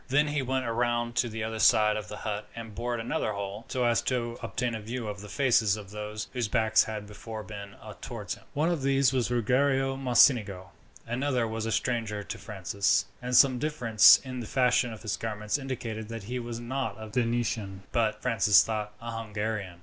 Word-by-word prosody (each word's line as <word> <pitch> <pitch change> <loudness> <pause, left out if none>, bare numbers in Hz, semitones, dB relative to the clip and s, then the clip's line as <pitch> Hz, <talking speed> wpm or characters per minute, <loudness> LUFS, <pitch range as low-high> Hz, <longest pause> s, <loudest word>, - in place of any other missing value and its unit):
Then 145 +3 +2
he 145 -1 0
went 130 0 -1
round 120 0 0
to 120 -1 +2
the 110 0 -4
other 110 0 -4
side 105 -2 +5
of 105 -3 -4
the 105 - -7
hut 105 0 -4
and 115 -2 -8
bored 120 +2 -3
another 115 - -1
hole, 100 +2 -5
so 125 -1 -1
as 115 -3 +3
to 120 -2 -2
obtain 125 -2 -2
a 110 - -4
view 115 +2 -5
of 100 -1 -5
the 105 - -10
faces 115 -7 +2
of 100 -2 -10
those 105 0 -5
whose 120 -4 -1
backs 110 +1 +3
had 105 -1 -5
before 110 +1 -8
been 100 -2 -9 0.3
towards - - -5
him. - - -13
One 155 +4 +2
of 165 -5 -1
these 135 -1 +3
was 125 -3 +1
Ruggiero 135 +3 +2
Mocenigo. 115 -7 +3 0.3
Another 125 0 0
was 110 0 -3
a - - -1
stranger 110 -2 -1
to - - -6
Francis, 100 -1 0 0.2
and 125 0 +2
some 130 -3 +6
difference 125 -8 +6
in 130 -1 -6
the 115 - -6
fashion 125 -1 +2
of 110 0 -10
his 105 -2 -2
garments 105 +3 -2
indicated 115 -5 -5
that 115 -2 -6
he 125 +5 -4
was 120 -1 -5
not 130 +3 -3
a 110 0 -8
Venetian, 115 -4 -1
but, 115 -3 0
Francis 105 -6 +5
thought, 105 -1 -3
a 115 0 -5
Hungarian. 105 -4 -4
115 Hz, 200 wpm, -28 LUFS, 105-125 Hz, 0.3 s, some